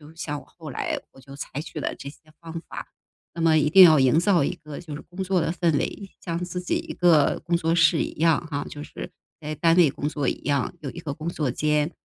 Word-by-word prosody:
像 150 -3 -4
我 - - -19
后 155 -4 -8
来， - - -2
我 - - -18
就 140 +1 -12
采 145 0 -5
取 155 - -7
了 - - -2
这 140 - -8
些 - - -14 0.2
方 165 0 -6
法。 - - -7 0.5
那 165 - -4
么 160 -1 +4
一 150 -1 +3
定 190 +4 +9
要 155 -4 +8
营 130 +5 +4
造 175 -3 +3
一 140 - -1
个 150 -1 -8
就 155 -4 -9
是 - - -8
工 190 +2 -6
作 185 -2 +1
的 165 - 0
氛 170 -3 +1
围， 195 -2 -4
像 170 -2 -2
自 180 0 -5
己 180 - -1
一 - - -6
个 165 -5 +3
工 170 0 +1
作 165 -1 0
室 165 -1 +4
一 - - -5
样 165 -2 +4
啊 145 0 -2
就 145 0 -8
是 - - -8 0.3
在 155 0 -4
单 165 +2 +3
位 170 -5 +6
工 145 - -4
作 145 -3 -2
一 - - -1
样， 140 -2 0
有 135 - -5
一 170 - -9
个 150 -4 -4
工 160 +2 -6
作 150 -6 -2
间。 150 +4 +1
160 Hz, 275 characters per minute, -25 LUFS, 145-170 Hz, 0.5 s, 定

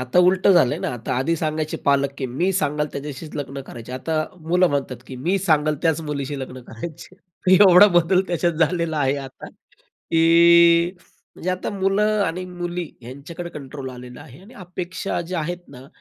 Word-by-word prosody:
आता 130 +7 0
उलटं 190 +1 +4
झालंय 125 -8 +3
ना. - - -2
आता 115 0 -4
आधी 165 +6 0
सांगायचे 155 -1 -2
पालक, 140 -1 +3
की 130 - -2
मी 170 +10 -1
सांगल 150 -5 0
त्याच्याशीच 145 +2 -7
लग्न 140 -1 -5
करायचे, 120 +1 -9
आता 155 +4 -2 0.2
मुलं 180 +3 +2
म्हणतात, 135 -3 -2
की 130 - -8
मी 175 +10 0
सांगल 155 -4 +2
त्याच 165 -1 +1
मुलीशी 140 -1 -4
लग्न 130 -1 -7
करायचे. 165 +9 -9 0.4
एवढा 190 0 +8
बदल 180 +2 +3
त्याच्यात 175 0 0
झालेला 160 0 0
आहे 135 0 +1
आता, 135 -1 -9 0.4
की 170 +1 +4 0.4
म्हणजे 185 - -3
आता 185 - -3
मुलं 205 +2 +1
आणि 180 +1 -2
मुली 175 -1 -5 0.2
यांच्याकडे 145 +8 -8
कंट्रोल 135 -3 -8
आलेला 125 0 -11
आहे. 130 +6 -14
आणि 220 +6 -16
अपेक्षा 180 0 -5
ज्या 175 0 -3
आहेत 175 +3 -3
ना 130 -1 -13
160 Hz, 170 wpm, -22 LUFS, 140-180 Hz, 0.4 s, एवढा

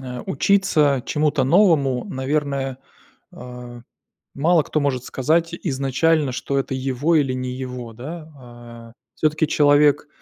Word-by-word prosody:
а, 125 -2 -7
учиться 150 -6 +2
чему-то 150 -3 0
новому, 140 -7 +3
наверное, 135 -1 -2 0.6
а, 125 -1 -10 0.5
мало 160 +3 +3
кто 155 - -2
может 130 -3 -1
сказать 165 +5 0
изначально, 140 0 0
что 140 +3 -2
это 135 0 -3
его 135 +5 0
или 135 -4 +1
не 130 0 -4
его, 125 -2 -7
да, 155 +7 -9
а. 120 -2 -13 0.2
Всё-таки 155 +1 0
человек 145 0 +3
140 Hz, 125 wpm, -21 LUFS, 125-155 Hz, 0.6 s, новому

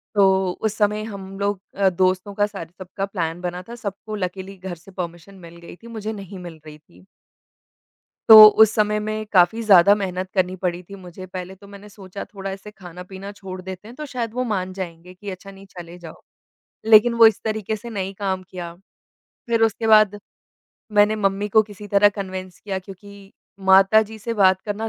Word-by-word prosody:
तो 190 -2 +3
उस 220 -1 -1
समय 210 0 +1
हम 195 -2 -9
लोग 200 -1 -1 0.2
अ, 195 -1 +3
दोस्तों 185 +2 0
का 205 0 +1
सारे 195 -6 -9
सबका 185 +1 -5
प्लान 175 -4 -4
बना 180 0 -4
था, 235 - -7
सबको 215 -1 -7
लकिली 190 0 -5
घर 185 -1 -7
से 170 +4 -17
परमिशन 175 +1 -7
मिल 170 -2 -14
गई 170 0 -12
थी, 230 +6 -16
मुझे 220 -1 -5
नहीं 195 -2 -9
मिल 170 -3 -10
रही 150 -1 -11
थी। 90 - -23 1.2
तो 220 -1 +12 0.2
उस 220 - +6
समय 210 0 +1
में 215 0 -4
काफ़ी 195 +4 +3
ज़्यादा 200 -2 +6
मेहनत 185 -2 -4
करनी 185 -1 0
पड़ी 180 -1 -3
थी 200 +3 -13
मुझे। 185 -1 -11
पहले 185 0 -8
तो 200 +1 -17
मैंने 200 +1 -13
सोचा 200 -1 -9
थोड़ा 195 -1 -8
ऐसे 195 +2 -9
खाना-पीना 190 +1 -10
छोड़ 190 -2 -9
देते 190 +2 -9
हैं, 240 - -12
तो 305 +1 -7
शायद 235 -4 -5
वो 255 0 -1
मान 190 -5 -3
जाएँगे 180 -1 -8
कि 200 +2 -8
अच्छा, 190 +1 -10
नहीं 195 0 -14
चले 175 -2 -11
जाओ। 170 -2 -12 0.6
लेकिन 225 +2 +6
वो 230 -1 +7
इस 220 - 0
तरीक़े 220 -1 -2
से 235 +3 -9
नहीं 195 -3 -4
काम 190 -2 -2
किया, 175 -2 -7 0.7
फिर 230 -1 +1
उसके 225 0 0
बाद 215 -2 +5 0.7
मैंने 210 +1 +4
मम्मी 200 0 -1
को 220 +1 +4
किसी 205 -1 -12
तरह 200 +1 +5
कन्विंस 185 -3 -7
किया 195 -2 -4
क्योंकि 195 +1 -14 0.3
माता 195 +3 +6
जी 220 +1 -10
से 230 +2 -4
बात 190 -3 +4
करना 215 +1 -4
195 Hz, 195 wpm, -22 LUFS, 185-210 Hz, 1.2 s, तो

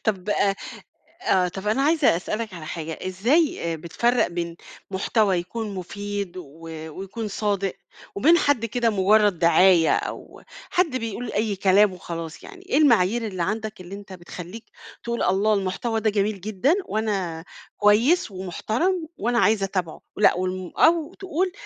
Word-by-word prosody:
طب 200 -3 -1
أ 200 -1 +2 0.7
آه. 180 -1 +3
طب 195 +3 -5
أنا 245 +6 +2
عايزة 300 - +3
أسألك 215 +4 -4
على 155 -2 -8
حاجة. 160 -1 -5
إزاي 200 - +1
أ - - -4
بتفرّق 235 +10 +1
بين 170 -1 -4 0.3
محتوى 195 0 +1
يكون 205 +4 -5
مُفيد 200 0 -5
و 180 - -6 0.5
ويكون 200 +3 -5
صادق، 200 -2 -1 0.4
وبين 315 +12 +5
حد 285 -7 +2
كده 230 +1 +1
مُجرّد 205 -1 +3
دعاية 170 0 +5
أو - - -6 0.3
حد 340 -7 +1
بيقول 230 0 -4
أي 210 -1 0
كلام 195 +1 +4
وخلاص 165 -2 -7
يعني 385 -2 -12
إيه 280 - +2
المعايير 235 -5 +3
اللي 185 -4 -3
عندك 220 +2 -3
اللي 185 +2 -9
أنت 200 -1 -10
بتخلّيك 180 +4 -9 0.4
تقول، 235 0 -2
الله 200 +3 +2
المحتوى 205 +4 -1
ده 215 0 +2
جميل 205 -1 -1
جدًا 215 - +1
وأنا 195 -7 -2 0.3
كويس 225 - +3
ومحترم 220 - -2
وأنا 240 0 0
عايز 210 -1 +3
أتابعه؟ 185 -4 -2 0.2
لأ 210 - +5
والم 185 0 -3
أو 325 -1 +3
تقول 370 -1 -2
205 Hz, 150 wpm, -24 LUFS, 185-230 Hz, 0.7 s, وبين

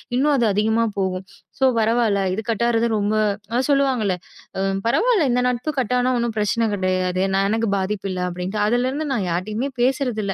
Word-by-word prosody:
இன்னும் 290 +4 +3
அது 235 - +2
அதிகமா 220 +3 +2 0.2
போகும். 185 0 -2 0.3
ஸோ 265 - +4
பரவாயில்ல. 225 -2 +2
இது 210 - -2
கட் 230 +1 0
ஆகுறது 235 0 +2
ரொம்ப 205 +1 0 0.4
அ - - +3
சொல்லுவாங்கல்ல 265 -9 +2 0.4
அ 190 - -1 0.2
பரவாயில்ல 420 - +3
இந்த 250 +1 +2
நட்பு 250 +4 -2
கட் 250 -2 0
ஆனா 250 +1 +2
ஒண்ணும் 235 -1 -1
பிரச்சனை 210 +2 +1
கிடையாது. 185 -1 0
நான் 195 0 +2
எனக்கு 225 +1 0
பாதிப்பு 195 +1 -2
இல்ல 185 - -4
அப்பிடின்டு. 180 +3 -4
அதுல 245 +4 +1
இருந்து 295 +3 -3
நான் 215 -7 0
யார்கிட்டயும் 215 +10 -3
பேசுறது 255 -3 +1
இல்ல. 195 - -2
225 Hz, 185 wpm, -21 LUFS, 195-250 Hz, 0.4 s, ஸோ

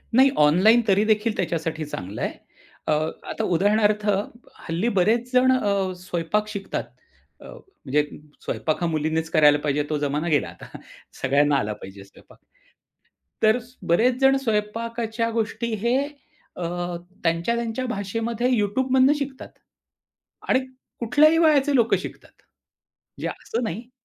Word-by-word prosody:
नाही, 265 +2 +7
ऑनलाईन 185 +11 +5
तरीदेखील 215 +2 +2
त्याच्यासाठी 160 -2 -2
चांगलं 100 -8 -6
आहे. - - -1 0.6
अ, - - +1 0.4
आता - - -3
उदाहरणार्थ 205 +4 +2 0.6
हल्ली 175 +8 0
बरेच 230 +6 +2
जण 255 +1 +5
अ, 200 -7 +1
स्वयंपाक 180 +4 -2
शिकतात. 200 -2 -4 0.6
अ, - - -12
म्हणजे 150 - -3 0.4
स्वयंपाक 155 +1 -2
हा 170 - +1
मुलीनेच 160 0 -1
करायला 150 -2 +5
पाहिजे 150 0 0
तो 155 - 0
जमाना 145 +3 -1
गेला 145 -3 +2
आता. - - -12 0.6
सगळ्यांना 145 +2 +3
आला 105 -4 -1
पाहिजे 95 0 -11
स्वयंपाक. 100 - -19 1.1
तर 220 +2 +5 0.3
बरेच 240 +9 +3
जणं 270 0 +5
स्वयंपाकाच्या 230 0 -2
गोष्टी 230 +1 -2
हे 240 +2 +3 0.6
अ, - - -8 0.6
त्यांच्या 170 +6 +1
त्यांच्या 235 +2 -3
भाषेमध्ये 230 +3 -2
YouTubeमधनं 260 +6 +3
शिकतात. 275 -2 -6 1.0
आणि - - +4 0.4
कुठल्याही 295 +7 +4
वयाचे 295 -3 +4
लोक 235 -2 +3
शिकतात. - - -9 0.9
म्हणजे - - -3
असं 235 +2 -4
नाही 225 +3 -5
210 Hz, 125 wpm, -24 LUFS, 160-240 Hz, 1.1 s, नाही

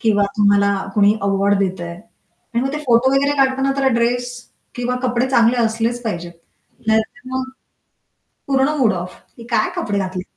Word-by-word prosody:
किंवा 210 -2 +2
तुम्हाला 200 -1 +3 0.2
कोणी 205 0 +4
अवॉर्ड 200 0 +2
देतंय. 180 -3 -2 0.6
आणि 235 - +2
मग 270 +1 -2
ते 300 - -2
फोटो 240 +2 +4
वगैरे 280 +1 +2
काढताना 270 0 +2
त्याला 270 0 +1
ड्रेस 245 +1 0 0.4
किंवा 245 0 -2
कपडे 245 0 0
चांगले 235 -1 +4
असलेच 230 +2 -1
पाहिजेत. 175 -6 -4 0.5
नाहीतर 220 +3 0
मग 260 0 -2 1.0
पूर्ण 270 0 +2
मूड 225 -6 +3
ऑफ 180 0 -5 0.2
हे - - -9
काय 255 +9 +1
कपडे 205 - -1
घातलेत? 185 -1 -3
230 Hz, 155 wpm, -19 LUFS, 200-260 Hz, 1.0 s, कोणी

